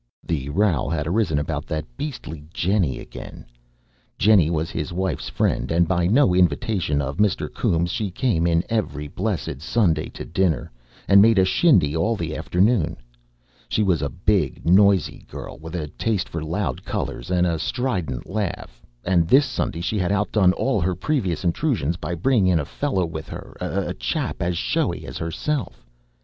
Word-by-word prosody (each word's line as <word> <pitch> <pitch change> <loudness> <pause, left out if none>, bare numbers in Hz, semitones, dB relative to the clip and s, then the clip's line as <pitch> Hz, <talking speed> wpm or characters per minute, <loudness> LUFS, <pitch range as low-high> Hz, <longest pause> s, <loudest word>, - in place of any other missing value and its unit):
The 70 -5 -3
row 85 -1 +1
had 80 -3 -1
arisen 85 -3 +1
about 75 +1 -3
that 75 -1 -3
beastly 125 - -6
Jennie 90 -5 +1
again. - - -10 0.7
Jennie 100 -6 +5
was 80 -1 -1
his 80 0 -3
wife's 95 +2 -2
friend, 60 - 0
and, 85 +1 +3
by 85 -2 +1
no 115 -1 +4
invitation 90 -3 +1
of 70 +1 -4
Mr. 105 -2 +1
Coombes, 85 0 0
she 105 -3 -2
came 90 -4 +1
in 85 0 +2
every 85 -10 -2
blessed 70 - -3
Sunday 80 -4 +1
to - - -8
dinner, 85 -5 0 0.4
and 100 0 +7
made 110 0 +5
a 95 - +5
shindy 95 - +3
all 105 +8 +1
the 80 -5 -4
afternoon. 90 0 +1 0.7
She 110 - +1
was 90 -5 +2
a 70 - -1
big, 90 -5 0
noisy 95 -1 +4
girl, - - -8
with 80 +3 -8
a 80 -4 -3
taste 100 +3 -1
for 80 -1 -4
loud 80 -4 -2
colours - - -4
and 90 -1 +2
a 85 -2 0
strident 90 - -2
laugh; 95 - -4 0.2
and 85 -3 +3
this 140 - +6
Sunday 85 - -3
she 105 +4 -1
had 90 0 0
outdone 100 -2 +3
all 105 -1 0
her 90 +2 0
previous 95 - -1
intrusions 85 - 0
by 85 0 -4
bringing 105 +2 +2
in 90 -3 +3
a 75 - -2
fellow 95 - -1
with 80 -1 -7
her, - - -9
a - - -2
chap - - -3
as 85 -1 0
showy - - -1
as - - -7
herself. 105 - -3
90 Hz, 170 wpm, -23 LUFS, 80-105 Hz, 0.7 s, and